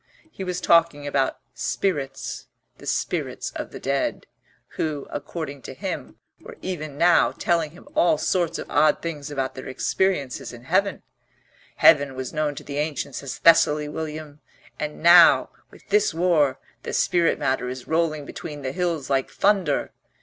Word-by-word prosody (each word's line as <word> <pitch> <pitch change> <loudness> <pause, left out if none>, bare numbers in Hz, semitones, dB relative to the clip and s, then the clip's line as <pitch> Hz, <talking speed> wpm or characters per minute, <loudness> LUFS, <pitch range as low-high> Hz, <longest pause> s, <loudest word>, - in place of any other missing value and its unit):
He 195 - -7
was 180 -1 -3
talking 165 -4 +3
about 135 -2 0 0.2
spirits 135 +3 -3 0.3
the - - -11
spirits - - -2
of - - -6
the - - -9
dead, 135 +1 -1 0.4
who, 150 -3 -3
according 145 -1 -5
to - - -9
him, - - -5 0.2
were - - -12
even 155 -6 -5
now 170 +2 +4
telling 170 -3 0
him 175 - -16
all 315 0 +3
sorts 175 -3 0
of - - -6
odd 150 +1 +3
things 150 -4 -5
about 135 -2 -2
their 130 - -8
experiences 140 -1 -1
in 120 0 -11
Heaven. 190 +8 0 0.7
"Heaven 145 -3 +5
was 130 -1 -5
known 150 -2 -1
to 150 - -8
the 145 0 -4
ancients 150 -3 -3
as 130 -3 -6
Thessaly, 150 0 +5
William, 155 -1 -6 0.4
and 150 +1 -5
now, 170 0 +7 0.2
with - - -19
this 420 +1 +2
war, 165 -6 +2 0.2
the - - -6
spirit 170 -2 +2
matter 130 -1 -1
is 125 -1 -7
rolling 160 -2 0
between 150 -2 -8
the 130 - -2
hills 170 -4 -2
like 135 -1 +1
thunder." 200 -2 +1
150 Hz, 155 wpm, -24 LUFS, 140-170 Hz, 0.7 s, now